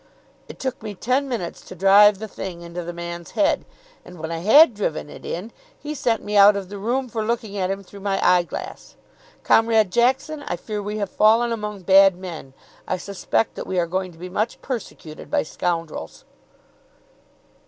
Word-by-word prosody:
It - - -11
took 260 -2 -4
me 210 -2 -6
ten 260 +7 0
minutes 220 -9 -4
to - - -11
drive 200 +2 +6
the 220 +2 -6
thing 185 -3 -7
into 170 +1 -6
the 170 - -5
man's 170 0 -7
head; 300 - +2 0.4
and 180 - -13
when 160 +1 -5
I 165 - -3
had 235 - +7
driven 160 -8 -3
it - - -12
in, 195 +7 -5 0.3
he 300 +1 -6
sent 240 -6 0
me 210 - -4
out 205 0 +8
of 195 -2 -5
the 205 0 -7
room 250 +6 -1
for 225 -2 -3
looking 220 -2 -2
at 185 -2 -1
him 195 +1 -3
through 200 +2 -13
my 195 0 -1
eye 180 -1 +5
glass. 170 - -8 0.5
Comrade 225 -3 +3
Jackson, 265 +6 +1
I - - -1
fear 210 +4 -5
me 205 - -6
we 210 +1 -3
have 200 -2 -3
fallen 225 +3 +4
among 210 -3 -4
bad 195 +1 +6
men. 170 -7 -9 0.3
I - - -1
suspect 200 +3 -1
that - - -7
we 185 - -2
are 175 - +2
going 185 +2 -3
to 165 - -18
be 180 +2 -7
much 210 +5 -2
persecuted 200 - -7
by - - +1
scoundrels." 165 - -4
200 Hz, 195 wpm, -22 LUFS, 180-225 Hz, 0.5 s, out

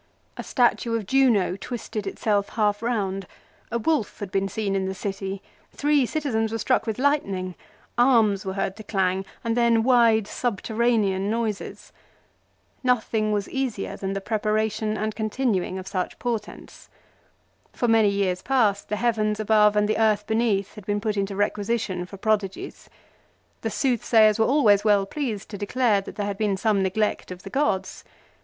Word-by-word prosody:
A - - -5
statue 240 -2 +1
of 225 -3 -2
Juno 230 -7 +3
twisted 215 -1 -5
itself 205 0 0
half 210 -2 0
round; 195 -5 -2 0.4
a 235 - 0
wolf 250 -2 0
had 200 -2 -6
been 195 0 0
seen 200 0 -2
in 190 -1 0
the 190 - -4
city; 195 0 -5 0.3
three 290 -3 +2
citizens 225 -8 -1
were 225 - -1
struck 255 +2 +1
with 220 - -2
lightning; 200 -10 0 0.5
arms 225 -6 +4
were 190 - -4
heard 195 -1 -2
to 215 - -9
clang, 190 -2 0 0.2
and 230 0 0
then 235 -2 +3
wide 230 -4 +4
subterranean 215 -3 0
noises. 220 -2 -3 0.9
Nothing 220 -3 +1
was 205 -1 -1
easier 260 -7 -3
than 195 0 -4
the 195 - -3
preparation 215 0 -1
and 215 0 -2
continuing 215 -4 -1
of 185 - -6
such 185 -2 -3
portents. 230 -4 -5 0.8
For 240 - -1
many 225 -2 +4
years 195 -2 0
past 220 -7 +1
the 210 - 0
heavens 215 -1 0
above 210 -1 +4
and 210 0 +3
the 215 - 0
earth 215 -2 +2
beneath 220 -3 0
had 210 - -11
been 205 0 0
put 210 0 -2
into 200 0 -2
requisition 205 -2 -1
for 195 - -10
prodigies. 200 -2 -2
1 - - -29 0.6
The - - -2
soothsayers 225 -4 +3
were 220 - +4
always 220 -8 +4
well 205 -2 +3
pleased 225 -4 -4
to 205 - -7
declare 210 -1 +1
that - - -10
there 205 - -2
had 200 -1 -4
been 205 -3 +1
some 205 -1 +1
neglect 200 +3 -1
of 180 0 -9
the 195 - -9
gods. 190 -10 -1
215 Hz, 165 wpm, -24 LUFS, 195-230 Hz, 0.9 s, arms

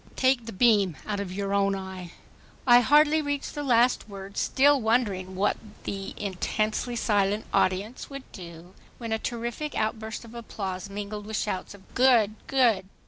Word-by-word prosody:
Take 260 -3 +2
the - - -4
beam 205 -5 +3
out 205 -1 -2
of 200 -2 -4
your 200 +1 -3
own 200 0 +2
eye." 190 -2 -7 0.5
I 245 -1 +8
hardly 295 +5 +4
reached 285 -1 -3
the 295 - -4
last 245 -4 +2
word, 195 0 -9
still 280 +4 +3
wondering 205 -5 0
what 195 +2 +1 0.3
the, 195 -1 -5
intensely 215 +4 -2
silent 205 -2 +1
audience 200 +6 0
would 275 -1 -7
do, 175 -1 -11 0.2
when 230 -2 -6
a 220 - 0
terrific 240 +6 -4
outburst 220 +1 -3
of 230 - -13
applause 200 -5 -5
mingled 205 +1 -6
with 220 0 -3
shouts 200 -1 -3
of 190 - -20
"Good! 240 -5 +4
Good! 235 -8 +2
215 Hz, 160 wpm, -27 LUFS, 195-245 Hz, 0.5 s, I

